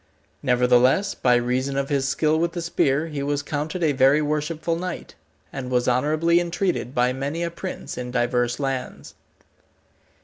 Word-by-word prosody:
Nevertheless, 125 +8 +3
by 125 -1 +2
reason 130 +3 0
of 140 0 -1
his 140 -2 0
skill 155 +3 +1
with 170 0 0
the 175 - -3
spear, 150 -3 +1
he 150 -3 -5
was 145 0 -1
counted 150 +4 -3
a 155 - +3
very 135 +2 +4
worshipful 155 +2 -1
knight, 180 +1 -5 0.4
and 130 -2 -5
was 125 -1 +1
honourably 155 +7 +2
entreated 175 -6 -2
by 125 +1 +2
many 140 +6 -3
a 170 - -2
prince 185 -4 -6
in 125 0 -5
divers 120 0 0
lands. 135 -2 -4
140 Hz, 160 wpm, -23 LUFS, 125-165 Hz, 0.4 s, very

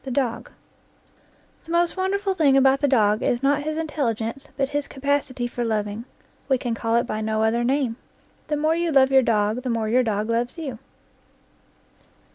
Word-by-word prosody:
THE 270 - -6
DOG 250 -2 -2 1.2
The 330 - -9
most 340 0 +2
wonderful 390 +1 0
thing 295 -7 +3
about 270 0 +4
the 285 - +2
dog 215 -5 +3
is 240 +2 0
not 285 +1 +2
his 310 +1 -3
intelligence, 275 -4 -3
but 270 -1 0
his 290 0 -2
capacity 280 -2 -2
for 240 0 -3
loving. 215 0 -2 0.4
We 265 - +4
can 245 -2 -3
call 230 0 -1
it 235 +2 +2
by 215 -2 -3
no 220 0 0
other 230 +2 +1
name. 255 -2 0 0.5
The 300 - -1
more 310 +2 +2
you 340 0 0
love 270 -2 +4
your 265 0 +6
dog, 215 0 +1
the 255 - -4
more 225 -2 -1
your 250 +3 +4
dog 215 -3 -1
loves 240 +4 -1
you. 270 -8 -6
260 Hz, 185 wpm, -23 LUFS, 230-290 Hz, 1.2 s, your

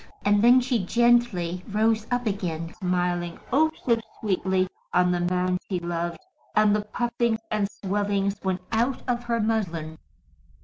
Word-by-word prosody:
And 205 +1 +4
then 245 +2 +7
she 245 -5 0
gently 205 -6 +2
rose 220 +1 +1
up 245 0 -1
again, 175 -6 -3
smiling, 175 -2 -1
oh, 315 +4 +5 0.2
so 235 -2 +3 0.2
sweetly, 190 -2 +1 0.3
on 180 0 +4
the 175 - 0
man 180 +1 0
she 190 - 0
loved, 170 0 -3 0.4
and 215 -1 +5
the 210 - +1
puffings 235 0 -1
and 210 -2 0
swellings 200 0 -1
went 190 -1 -1
out 240 +4 +1
of 245 -1 -1
her 235 -1 0
muslin. 170 -8 -2
200 Hz, 145 wpm, -25 LUFS, 180-230 Hz, 0.4 s, then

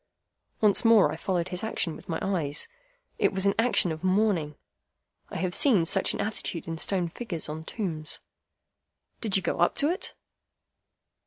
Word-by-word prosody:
Once 210 -2 +5
more 220 -9 +6
I - - -4
followed 175 +1 -2
his 180 +1 -4
action 185 -7 -1
with - - -14
my 165 - -1
eyes. 165 -7 -1 0.5
It - - +3
was 190 0 -1
an 200 - +4
action 225 -6 +4
of 160 +2 -6
mourning. 185 -6 +1 0.7
I - - -5
have 185 -1 -1
seen 210 - +4
such 190 +3 +1
an - - -6
attitude 205 -6 -3
in 165 -1 -4
stone 185 -1 0
figures 175 -1 -5
on 155 +1 -6
tombs. 165 -9 -3 1.0
"Did 215 -5 -1
you 190 - -3
go - - -2
up 175 - +3
to 290 +3 +2
it?" 365 - -4
185 Hz, 170 wpm, -27 LUFS, 165-210 Hz, 1.0 s, more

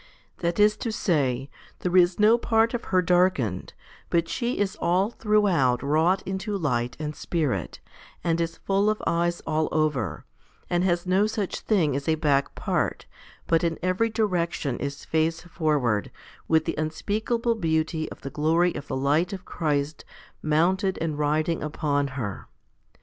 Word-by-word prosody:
That 170 +1 -1
is 210 +1 +5
to 230 - -3
say, 135 - 0 0.3
there 180 0 -1
is 180 0 +5
no 220 +3 +5
part 225 0 +2
of 240 - -3
her 185 -1 +2
darkened, 175 - +1 0.3
but 170 -1 +1
she 240 +5 -2
is 200 -2 0
all 185 +5 +1
throughout 195 - +2
wrought 160 +6 +2
into 190 +2 -3
light 125 -7 -1
and 150 -1 -4
spirit, 140 - -2 0.4
and 170 0 +1
is 165 0 -3
full 200 +2 +1
of 215 - 0
eyes 170 0 0
all 155 0 0
over, 155 -3 -1 0.5
and 175 0 +2
has 175 -1 +1
no 190 +3 +3
such 210 -3 -3
thing 165 -10 +1
as 140 +2 -4
a 160 - +4
back 145 -3 +1
part, - - -1 0.4
but 165 +1 +2
in 165 -1 0
every 185 +5 +1
direction 175 - -1
is 140 0 -5
face 160 +1 0
forward, 150 - 0 0.4
with 160 -1 +3
the - - -1
unspeakable 220 +9 -1
beauty 160 -4 -1
of - - -11
the 135 - -6
glory 165 +4 +2
of 145 - -7
the 130 - -2
light 150 +6 +1
of 185 -2 -7
Christ 150 -2 -2 0.4
mounted 185 +5 +1
and 155 -2 -2
riding 155 +2 +1
upon 145 -2 -1
her. 100 -6 -4
165 Hz, 160 wpm, -25 LUFS, 150-190 Hz, 0.5 s, is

